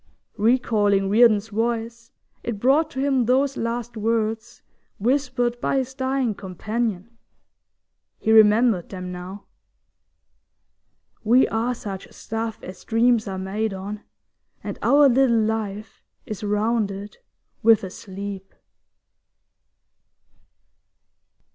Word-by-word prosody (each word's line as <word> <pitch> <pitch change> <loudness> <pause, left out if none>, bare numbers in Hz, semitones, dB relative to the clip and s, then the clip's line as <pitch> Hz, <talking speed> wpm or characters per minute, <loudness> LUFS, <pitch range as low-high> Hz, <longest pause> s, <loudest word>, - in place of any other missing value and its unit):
Recalling 205 -4 +2
Reardon's 220 -1 +4
voice, 230 +1 -3 0.3
it 230 -3 -4
brought 285 +7 +3
to 265 - -7
him 270 -3 +1
those 265 +3 +2
last 235 0 -3
words 220 +1 -2 0.3
whispered 245 0 0
by - - 0
his 260 -1 -2
dying 260 -3 -1
companion. 215 +3 -4 1.0
He 220 - 0
remembered 220 -3 +5
them 185 -1 -6
now: 180 +3 -8 1.8
We 240 +4 +4
are 235 +3 -1
such 195 -5 -7
stuff 225 0 -5
As 185 0 -10
dreams 230 -1 +2
are 190 -1 -4
made 195 +2 -2
on, 200 +2 -6 0.6
and - - -6
our 285 0 +5
little 255 -2 +3
life 215 -1 -3 0.2
Is 215 -1 -7
rounded 210 - -1 0.4
with 225 -2 +5
a 190 - -6
sleep. 195 0 -8
225 Hz, 105 wpm, -23 LUFS, 205-240 Hz, 1.8 s, remembered